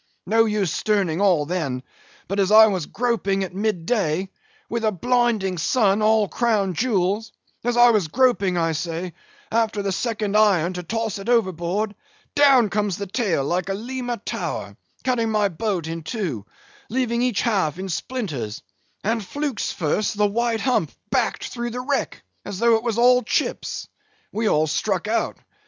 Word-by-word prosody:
No 225 Hz, +3 st, +4 dB
use 210 Hz, -6 st, 0 dB
sterning 195 Hz, -5 st, 0 dB
all, 180 Hz, -7 st, +3 dB
then; 145 Hz, -7 st, -2 dB, 0.4 s
but 195 Hz, +2 st, -2 dB
as 195 Hz, -1 st, +2 dB
I 220 Hz, +1 st, +9 dB
was 185 Hz, -7 st, -1 dB
groping 220 Hz, -5 st, 0 dB
at 185 Hz, -, -6 dB
midday, 190 Hz, -3 st, 0 dB, 0.4 s
with 235 Hz, -1 st, -3 dB
a 215 Hz, -, +3 dB
blinding 220 Hz, -3 st, +1 dB
sun, 205 Hz, +3 st, +2 dB
all 215 Hz, -1 st, +3 dB
crown 210 Hz, -4 st, +1 dB
jewels; 210 Hz, 0 st, 0 dB, 0.3 s
as 240 Hz, 0 st, 0 dB
I 240 Hz, 0 st, +7 dB
was 205 Hz, -7 st, +1 dB
groping, 200 Hz, -3 st, +2 dB
I 165 Hz, -1 st, +1 dB
say, 165 Hz, +2 st, -4 dB, 0.4 s
after 220 Hz, -2 st, +1 dB
the 195 Hz, -, -1 dB
second 210 Hz, 0 st, -2 dB
iron, 190 Hz, -5 st, +4 dB
to 180 Hz, -, -4 dB
toss 220 Hz, +3 st, -3 dB
it 195 Hz, +4 st, -6 dB
overboard—down 215 Hz, -, +1 dB
comes 205 Hz, -3 st, 0 dB
the 200 Hz, -, -4 dB
tail 195 Hz, -, 0 dB
like 180 Hz, +4 st, -1 dB
a 195 Hz, -, 0 dB
Lima 245 Hz, +2 st, -4 dB
tower, 205 Hz, -, -4 dB, 0.3 s
cutting 245 Hz, -4 st, +1 dB
my 210 Hz, -2 st, +2 dB
boat 185 Hz, -1 st, -2 dB
in 165 Hz, +1 st, -4 dB
two, 155 Hz, -, -4 dB, 0.4 s
leaving 240 Hz, -1 st, 0 dB
each 245 Hz, -4 st, +1 dB
half 190 Hz, -, +1 dB
in 190 Hz, +1 st, -5 dB
splinters; 165 Hz, -, -4 dB, 0.4 s
and, 225 Hz, +1 st, 0 dB
flukes 285 Hz, +2 st, -3 dB
first, 190 Hz, +6 st, -1 dB
the 210 Hz, -, +3 dB
white 230 Hz, +2 st, 0 dB
hump 220 Hz, -, +1 dB, 0.2 s
backed 250 Hz, -4 st, 0 dB
through 240 Hz, -1 st, -4 dB
the 245 Hz, +2 st, -5 dB
wreck, 280 Hz, +2 st, -2 dB, 0.2 s
as 195 Hz, -, -6 dB
though 235 Hz, +3 st, +4 dB
it 225 Hz, -, +3 dB
was 235 Hz, -2 st, -1 dB
all 250 Hz, +1 st, +5 dB
chips. 245 Hz, -, -2 dB, 0.4 s
We 215 Hz, +1 st, 0 dB
all 155 Hz, +1 st, +3 dB
struck 185 Hz, +5 st, -1 dB
out. 225 Hz, +2 st, 0 dB
210 Hz, 165 wpm, -23 LUFS, 180-235 Hz, 0.4 s, I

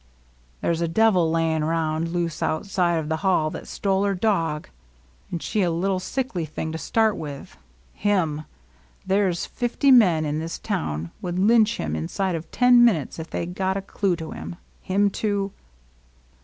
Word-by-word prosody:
There -, -, +1 dB
's 165 Hz, -, -3 dB
a 170 Hz, -, +1 dB
devil 185 Hz, -2 st, +3 dB
layin' 160 Hz, -1 st, +1 dB
round 160 Hz, 0 st, 0 dB
loose 170 Hz, -1 st, -2 dB
out 155 Hz, -, -1 dB
side 180 Hz, -3 st, +1 dB
of 160 Hz, -, 0 dB
hell 180 Hz, -5 st, +2 dB
that -, -, -7 dB
^tole 195 Hz, -1 st, 0 dB
her 200 Hz, -, 0 dB
dog, 170 Hz, -7 st, 0 dB, 0.3 s
— 60 Hz, +1 st, -33 dB
and 170 Hz, -, -4 dB
she 215 Hz, -, 0 dB
a 180 Hz, -, +2 dB
little 185 Hz, +3 st, 0 dB
sickly 195 Hz, -3 st, -3 dB
thing 155 Hz, +1 st, -4 dB
to 160 Hz, -, -5 dB
start 220 Hz, +1 st, +2 dB
with, 145 Hz, -3 st, -7 dB, 0.4 s
him! 165 Hz, -7 st, 0 dB, 0.6 s
There 190 Hz, 0 st, +2 dB
's 170 Hz, -, -3 dB
fifty 250 Hz, +3 st, +1 dB
men 180 Hz, -11 st, +5 dB
in 150 Hz, +1 st, -1 dB
this 165 Hz, +1 st, -4 dB
town 85 Hz, -, -3 dB
would 175 Hz, -1 st, -3 dB
lynch 220 Hz, +3 st, +4 dB
him 80 Hz, -1 st, -2 dB
inside 180 Hz, -, -2 dB
of 160 Hz, -1 st, -5 dB
ten 245 Hz, 0 st, +5 dB
min 235 Hz, -5 st, +6 dB
utes, 150 Hz, +1 st, -6 dB
if 160 Hz, -, -6 dB
they -, -, -3 dB
got 190 Hz, +2 st, -2 dB
a -, -, -2 dB
clue 195 Hz, -2 st, 0 dB
to 160 Hz, -2 st, -7 dB
him, -, -, -7 dB, 0.3 s
him 200 Hz, +2 st, +1 dB
to! 200 Hz, -2 st, 0 dB
175 Hz, 185 wpm, -24 LUFS, 160-200 Hz, 0.6 s, min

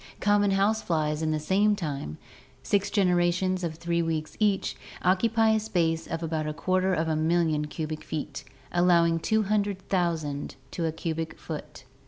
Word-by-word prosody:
Common 205 Hz, 0 st, +3 dB
house 200 Hz, +3 st, +2 dB
flies 155 Hz, -2 st, 0 dB
would 160 Hz, -, -1 dB
in -, -, +1 dB
the 155 Hz, -, 0 dB
same 200 Hz, +6 st, +2 dB
time 140 Hz, -, -4 dB, 0.2 s
— 130 Hz, 0 st, -29 dB
six 200 Hz, +4 st, +1 dB
generations 185 Hz, -1 st, +2 dB
of 165 Hz, -2 st, -2 dB
three 170 Hz, +1 st, -1 dB
weeks 160 Hz, -2 st, -2 dB
each 205 Hz, -3 st, +1 dB, 0.2 s
— -, -, -15 dB
occupy 225 Hz, +5 st, +3 dB
a 220 Hz, -, +3 dB
space 165 Hz, -6 st, 0 dB
of 165 Hz, +1 st, -4 dB
about 155 Hz, -1 st, -2 dB
a 155 Hz, -, -2 dB
quarter 185 Hz, +2 st, +1 dB
of 165 Hz, -2 st, 0 dB
a 160 Hz, -, +1 dB
million 160 Hz, -1 st, +1 dB
cubic 155 Hz, 0 st, -5 dB
feet, 155 Hz, -1 st, -5 dB, 0.3 s
allowing 170 Hz, -2 st, +4 dB
200,000 190 Hz, -8 st, 0 dB, 0.2 s
to 170 Hz, -, -2 dB
a -, -, 0 dB
cubic 160 Hz, 0 st, -4 dB
foot. 150 Hz, -3 st, -8 dB
170 Hz, 170 wpm, -27 LUFS, 155-195 Hz, 0.3 s, allowing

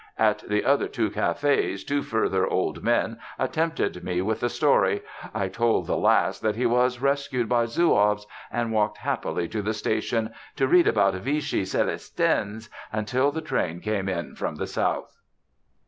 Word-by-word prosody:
At 110 Hz, -1 st, +3 dB
the 105 Hz, 0 st, +1 dB
other 140 Hz, +1 st, +3 dB
two 110 Hz, -4 st, -1 dB
cafés 140 Hz, -9 st, 0 dB
two 145 Hz, 0 st, 0 dB
further 95 Hz, -6 st, 0 dB
old 95 Hz, -, -1 dB
men 115 Hz, -1 st, +1 dB, 0.2 s
attempted 160 Hz, -, -1 dB
me 90 Hz, -1 st, -1 dB
with 110 Hz, +2 st, -1 dB
the 120 Hz, -, 0 dB
story; -, -, +2 dB, 0.3 s
I 100 Hz, -3 st, -1 dB
told 115 Hz, +3 st, +1 dB
the -, -, 0 dB
last -, -, +2 dB
that 110 Hz, -1 st, 0 dB
he 125 Hz, +3 st, -1 dB
was 125 Hz, +1 st, +2 dB
rescued 140 Hz, -3 st, 0 dB
by 120 Hz, -1 st, +2 dB
Zouaves, 105 Hz, -7 st, +2 dB, 0.3 s
and 120 Hz, -1 st, -1 dB
walked 105 Hz, -1 st, +1 dB
happily 85 Hz, -, -2 dB
to 110 Hz, -, -2 dB
the 110 Hz, +2 st, -2 dB
station, 110 Hz, +1 st, -1 dB, 0.2 s
to 135 Hz, -2 st, +2 dB
read 175 Hz, +5 st, +5 dB
about 100 Hz, -3 st, +3 dB
Vichy 145 Hz, +9 st, -1 dB
Célestins 105 Hz, +3 st, -1 dB, 0.2 s
until 125 Hz, +6 st, +1 dB
the 160 Hz, +2 st, -4 dB
train 85 Hz, -, -2 dB
came 100 Hz, -1 st, -2 dB
in 85 Hz, -3 st, -3 dB
from -, -, -3 dB
the -, -, -3 dB
south. -, -, -2 dB
115 Hz, 160 wpm, -25 LUFS, 105-130 Hz, 0.3 s, read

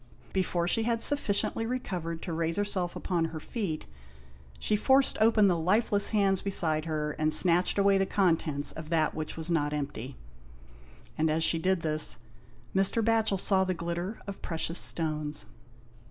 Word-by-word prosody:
Before 180 Hz, -2 st, 0 dB
she 225 Hz, -, +3 dB
had 230 Hz, 0 st, 0 dB
sufficiently 225 Hz, -5 st, +1 dB
recovered 180 Hz, -9 st, -4 dB
to 170 Hz, -, -4 dB
raise 165 Hz, 0 st, -1 dB
herself 190 Hz, -4 st, -2 dB
upon 170 Hz, -3 st, -1 dB
her 160 Hz, -1 st, -6 dB
feet, 170 Hz, -4 st, -4 dB, 0.7 s
she 210 Hz, -, 0 dB
forced 265 Hz, +5 st, +3 dB
open 220 Hz, -2 st, +5 dB
the 180 Hz, -, +2 dB
lifeless 205 Hz, +5 st, +1 dB
hands 195 Hz, -3 st, +1 dB
beside 160 Hz, -5 st, +3 dB
her 155 Hz, -2 st, -2 dB
and 155 Hz, 0 st, +1 dB
snatched 180 Hz, +3 st, +3 dB
away 200 Hz, -1 st, +4 dB
the 195 Hz, -, +1 dB
contents 160 Hz, -6 st, 0 dB
of 155 Hz, -1 st, -9 dB
that 160 Hz, -2 st, +1 dB
which 155 Hz, 0 st, -5 dB
was 165 Hz, +1 st, -4 dB
not 150 Hz, -3 st, 0 dB
empty; 140 Hz, -3 st, -5 dB, 1.0 s
and 160 Hz, 0 st, +2 dB
as 160 Hz, +1 st, +1 dB
she 165 Hz, -, +3 dB
did 185 Hz, 0 st, 0 dB
this, 155 Hz, -1 st, +1 dB, 0.6 s
Mr. 195 Hz, +3 st, +3 dB
Batchel 225 Hz, -3 st, +2 dB
saw 190 Hz, 0 st, +2 dB
the 185 Hz, -1 st, -1 dB
glitter 170 Hz, +5 st, -4 dB
of 200 Hz, -1 st, -8 dB
precious 165 Hz, +1 st, -3 dB
stones. 150 Hz, -2 st, -3 dB
175 Hz, 160 wpm, -29 LUFS, 160-200 Hz, 1.0 s, open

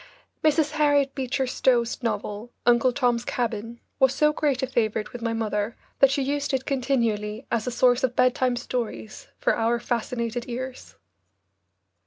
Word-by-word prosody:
Mrs. 305 Hz, -1 st, +3 dB
Harriet 290 Hz, -3 st, +2 dB
Beecher 265 Hz, 0 st, -1 dB
Stowe's 245 Hz, -1 st, +1 dB
novel, 225 Hz, -1 st, -3 dB
"Uncle 240 Hz, +1 st, +4 dB
Tom's 245 Hz, -2 st, +1 dB
Cabin," 235 Hz, -1 st, -3 dB, 0.2 s
was 265 Hz, 0 st, +4 dB
so 300 Hz, 0 st, +3 dB
great 280 Hz, -4 st, 0 dB
a -, -, +4 dB
favourite 220 Hz, -4 st, -1 dB
with 245 Hz, -, -7 dB
my 230 Hz, 0 st, -1 dB
mother 220 Hz, -1 st, -2 dB, 0.2 s
that 275 Hz, -, +7 dB
she 275 Hz, 0 st, 0 dB
used 285 Hz, 0 st, -1 dB
it 265 Hz, 0 st, -3 dB
continually 235 Hz, -4 st, -1 dB
as 230 Hz, 0 st, 0 dB
a -, -, 0 dB
source 245 Hz, +2 st, +3 dB
of 250 Hz, -2 st, +1 dB
bedtime 255 Hz, 0 st, +2 dB
stories 240 Hz, -3 st, -5 dB
for -, -, +1 dB
our 230 Hz, +1 st, +1 dB
fascinated 235 Hz, 0 st, -2 dB
ears. 255 Hz, +2 st, -6 dB
245 Hz, 155 wpm, -25 LUFS, 230-265 Hz, 0.2 s, that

